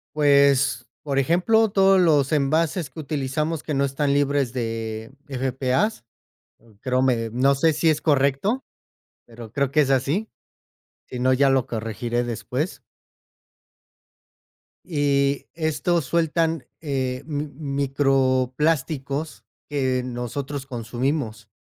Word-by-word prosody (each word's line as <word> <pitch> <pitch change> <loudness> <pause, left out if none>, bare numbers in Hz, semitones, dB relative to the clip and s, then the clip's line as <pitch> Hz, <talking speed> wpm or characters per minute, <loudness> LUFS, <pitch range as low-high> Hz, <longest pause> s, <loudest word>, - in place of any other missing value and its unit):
Pues, 140 -4 +3 0.2
por 140 -2 0
ejemplo, 185 - +3
todos 195 -1 +4
los 150 -6 +3
envases 155 +2 +1
que 145 - -11
utilizamos 150 +2 -2
que 155 - -3
no 140 0 +2
están 140 +1 0
libres 140 -3 +1
de 115 -2 -4 0.2
PFAS, 130 - -1 0.8
creo 130 0 0
me 115 -4 +1
no 135 +3 +3
sé 160 +4 +3
si 155 +2 +1
es 155 -1 0
correcto, 145 - +1 0.6
pero 115 -2 -11
creo 140 0 0
que 150 - +3
es 135 - -1
así. 140 - +1 0.8
Si 125 - -6
no, 130 +1 +3
ya 135 +1 +4
lo 135 -2 +2
corregiré 115 +2 -2
después. 125 +7 -3 2.0
Y 140 -3 +1
estos 160 0 0
sueltan, 165 0 0 0.2
eh, 130 -3 -2
mi 150 -1 -3
microplásticos 140 +1 0 0.3
que 130 -3 0
nosotros 130 +3 -5
consumimos. 120 -2 -3
140 Hz, 115 wpm, -23 LUFS, 130-155 Hz, 2.0 s, todos